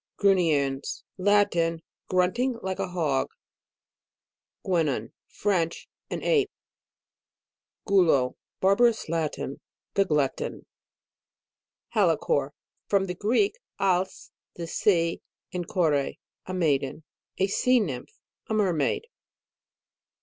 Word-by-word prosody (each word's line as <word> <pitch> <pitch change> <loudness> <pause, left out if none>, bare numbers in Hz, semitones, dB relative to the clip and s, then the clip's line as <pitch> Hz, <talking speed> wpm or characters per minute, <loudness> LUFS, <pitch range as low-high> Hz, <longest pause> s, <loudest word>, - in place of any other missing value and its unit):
GRUNNIENS. 155 -9 +2 0.2
Latin. 185 -5 +2 0.3
Grunting 230 +8 +1
like 190 0 -3
a - - 0
hog. 155 -7 0 1.4
GUENON. 150 - 0
French. 180 -5 -1 0.2
An - - -4
ape. 425 -4 +3 1.4
GULO. 165 -10 +3 0.3
Barbarous 220 +4 +4
Latin. 155 -4 -2 0.3
The 195 - +3
glutton 150 -6 -1 1.2
HALICORE. 165 -8 +2 0.4
From 195 -1 +2
the 180 - -3
Greek, 250 - +1 0.2
als, 190 -1 0 0.2
the 170 - -5
sea, 170 -1 +1 0.3
and 175 -2 -3
kore, 170 -6 +2 0.5
a 185 - -4
maiden. 150 -3 0 0.3
A 190 - +3
sea 250 +6 +3
nymph; 140 - -4 0.3
a 220 - -1
mermaid. 185 - +1
180 Hz, 90 wpm, -27 LUFS, 160-200 Hz, 1.4 s, Barbarous